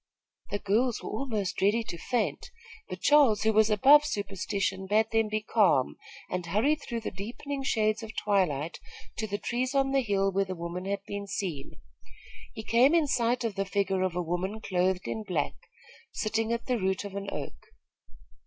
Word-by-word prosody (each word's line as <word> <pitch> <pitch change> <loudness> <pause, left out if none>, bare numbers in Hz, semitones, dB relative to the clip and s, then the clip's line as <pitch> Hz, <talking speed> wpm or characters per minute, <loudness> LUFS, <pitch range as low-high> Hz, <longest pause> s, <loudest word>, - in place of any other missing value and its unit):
The 205 - -1
girls 225 +5 0
were - - -5
almost 215 -5 -2
ready 210 +4 +3
to 195 - -6
faint; 245 - -2 0.4
but - - -6
Charles, 280 -8 +5
who 220 0 +3
was 220 +1 +4
above 275 +8 +7
superstition, 195 -6 -2
bade 215 +3 +2
them 225 -1 +2
be 215 0 -2
calm 195 - +3 0.3
and 180 -1 -3
hurried 225 - +1
through 235 -1 -4
the - - -4
deepening 245 +9 -5
shades 215 -4 +1
of 225 0 -8
twilight 170 -7 0 0.4
to 220 - -1
the 205 0 -2
trees 250 +5 -2
on 270 0 +2
the 270 0 +3
hill 195 -4 +1
where 195 +1 +1
the 185 -1 -5
woman 170 +2 -5
had 200 0 -2
been 200 0 -5
seen. 185 -8 -4 0.8
He 220 - -7
came 250 +8 +4
in 330 -3 +4
sight 245 -2 +1
of 225 -3 -1
the 195 0 -1
figure 195 -1 0
of 185 -2 0
a 180 - 0
woman 180 +5 -2
clothed 185 -2 0
in 220 - -3
black, 180 -8 -1 0.6
sitting 225 +1 -1
at 235 0 -2
the 250 -2 0
root 190 +1 -1
of 200 - -7
an 200 0 -4
oak. 145 - -7
210 Hz, 185 wpm, -28 LUFS, 190-230 Hz, 0.8 s, above